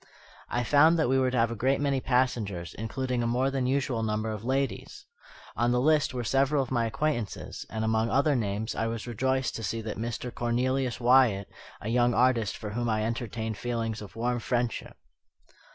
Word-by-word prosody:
I 120 Hz, -, 0 dB
found 150 Hz, +7 st, +5 dB
that 160 Hz, -6 st, +2 dB
we 135 Hz, 0 st, +3 dB
were 130 Hz, -1 st, +2 dB
to 125 Hz, -, -2 dB
have 115 Hz, 0 st, +2 dB
a -, -, -3 dB
great 130 Hz, +5 st, +1 dB
many 140 Hz, -2 st, 0 dB
passengers, 120 Hz, -10 st, 0 dB
including 125 Hz, +3 st, -2 dB
a 120 Hz, -, 0 dB
more 125 Hz, +3 st, +1 dB
than 135 Hz, -2 st, -1 dB
usual 130 Hz, -3 st, 0 dB
number 110 Hz, 0 st, -1 dB
of 105 Hz, -1 st, -6 dB
ladies. 135 Hz, +1 st, -2 dB, 0.5 s
On 120 Hz, +1 st, +2 dB
the 125 Hz, -, +2 dB
list 150 Hz, +2 st, +3 dB
were 125 Hz, -1 st, -3 dB
several 135 Hz, +4 st, +2 dB
of 130 Hz, -, -9 dB
my 120 Hz, -3 st, +1 dB
acquaintances; 120 Hz, -3 st, -3 dB
and 110 Hz, 0 st, -2 dB
among 110 Hz, +1 st, +1 dB
other 140 Hz, +3 st, +3 dB
names 110 Hz, -1 st, -2 dB
I 115 Hz, -, -1 dB
was 115 Hz, 0 st, -4 dB
rejoiced 130 Hz, +3 st, -1 dB
to 115 Hz, -, -6 dB
see 115 Hz, +2 st, -2 dB
that 110 Hz, -1 st, -5 dB
of -, -, -5 dB
Mr. 120 Hz, +1 st, -4 dB
Cornelius 125 Hz, +1 st, 0 dB
Wyatt, 120 Hz, -5 st, +4 dB, 0.3 s
a 110 Hz, -, -4 dB
young 120 Hz, 0 st, +3 dB
artist, 120 Hz, -4 st, +2 dB
for 105 Hz, -2 st, -6 dB
whom 120 Hz, +2 st, -1 dB
I 110 Hz, -1 st, +1 dB
entertained 115 Hz, -1 st, -3 dB
feelings 115 Hz, -3 st, -2 dB
of 105 Hz, -, -10 dB
warm 120 Hz, +2 st, -1 dB
friendship. 120 Hz, 0 st, -2 dB
120 Hz, 200 wpm, -28 LUFS, 110-130 Hz, 0.5 s, found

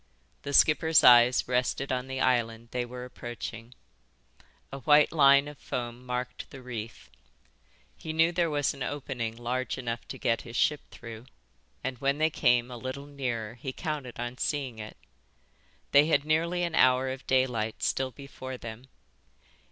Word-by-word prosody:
The 140 Hz, -, -5 dB
skipper's 155 Hz, +2 st, +5 dB
eyes 120 Hz, +1 st, +7 dB
rested 125 Hz, +2 st, 0 dB
on 130 Hz, 0 st, -2 dB
the 130 Hz, 0 st, -4 dB
island 115 Hz, -3 st, 0 dB
they 125 Hz, -1 st, -2 dB
were 125 Hz, +1 st, -8 dB
approaching. 120 Hz, -1 st, -8 dB, 1.0 s
A 135 Hz, -, -6 dB
white 150 Hz, +3 st, +5 dB
line 140 Hz, -2 st, +5 dB
of 150 Hz, -2 st, -10 dB
foam 120 Hz, 0 st, -5 dB
marked 125 Hz, 0 st, -4 dB
the 135 Hz, -, -10 dB
reef. 115 Hz, -2 st, -7 dB, 0.9 s
He 160 Hz, -, -6 dB
knew 165 Hz, +2 st, +3 dB
there 175 Hz, -1 st, +1 dB
was 145 Hz, -2 st, 0 dB
an 135 Hz, -, -13 dB
opening 125 Hz, -5 st, -3 dB
large 125 Hz, +2 st, -2 dB
enough 120 Hz, -2 st, -4 dB
to -, -, -7 dB
get 115 Hz, -, 0 dB
his 120 Hz, 0 st, -10 dB
ship 150 Hz, +3 st, +2 dB
through, 115 Hz, 0 st, -10 dB, 0.6 s
and 130 Hz, -2 st, -4 dB
when 140 Hz, +1 st, +1 dB
they 155 Hz, +1 st, +2 dB
came 125 Hz, -3 st, +2 dB
a 120 Hz, -, -6 dB
little 130 Hz, +3 st, -6 dB
nearer 125 Hz, -6 st, -4 dB
he 125 Hz, +2 st, -6 dB
counted 145 Hz, -5 st, -5 dB
on 120 Hz, +1 st, -5 dB
seeing 135 Hz, -6 st, -2 dB
it. 105 Hz, 0 st, -8 dB, 0.9 s
They 145 Hz, +2 st, +6 dB
had 145 Hz, -3 st, +2 dB
nearly 170 Hz, +3 st, +1 dB
an 170 Hz, -2 st, -2 dB
hour 130 Hz, -2 st, +4 dB
of 130 Hz, 0 st, -7 dB
daylight 125 Hz, -4 st, 0 dB
still 130 Hz, 0 st, 0 dB
before 130 Hz, 0 st, -9 dB
them. 115 Hz, +1 st, -9 dB
130 Hz, 160 wpm, -28 LUFS, 120-140 Hz, 1.0 s, eyes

